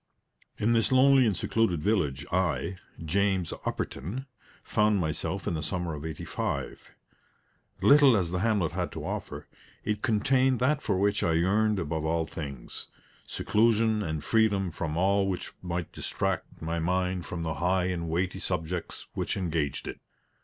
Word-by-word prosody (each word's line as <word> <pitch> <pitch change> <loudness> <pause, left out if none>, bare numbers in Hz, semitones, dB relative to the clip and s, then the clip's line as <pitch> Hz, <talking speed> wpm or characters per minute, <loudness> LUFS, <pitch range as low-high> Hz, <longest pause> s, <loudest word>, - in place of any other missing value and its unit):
In 115 +3 +2
this 115 +1 +2
lonely 130 -1 +6
and 100 - 0
secluded 90 -9 +1
village, 90 -10 +1
I, 90 -1 0 0.3
James 95 +1 +1
Upperton, 110 - -3 0.4
found 105 -1 +2
myself 80 -3 -2
in - - 0
the 80 - -2
summer 85 +1 -2
of 75 -1 -6
'85. 80 -2 -4 0.9
Little 140 -4 +7
as 90 -3 -1
the 90 - -1
hamlet 100 -6 +1
had 90 +1 -2
to - - -6
offer, - - -5 0.4
it 105 0 -1
contained 130 +3 +3
that 140 +4 +2
for 100 - 0
which 100 +2 +2
I 85 - +2
yearned 105 +6 +2
above 80 -3 -2
all 80 +1 +1
things 70 -6 -7 0.4
seclusion 110 0 +2
and 80 -6 -3
freedom 100 -4 +2
from 80 -1 -3
all 95 +2 +3
which 95 -2 -3
might 90 -2 -3
distract - - -3
my 85 +1 -1
mind 90 +1 0
from 85 -2 -4
the 80 -1 -1
high 90 +1 +2
and 85 -2 -2
weighty 90 +3 -1
subjects 90 -1 -3
which - - -2
engaged 80 -7 -2
it. - - -6
95 Hz, 155 wpm, -28 LUFS, 85-105 Hz, 0.9 s, Little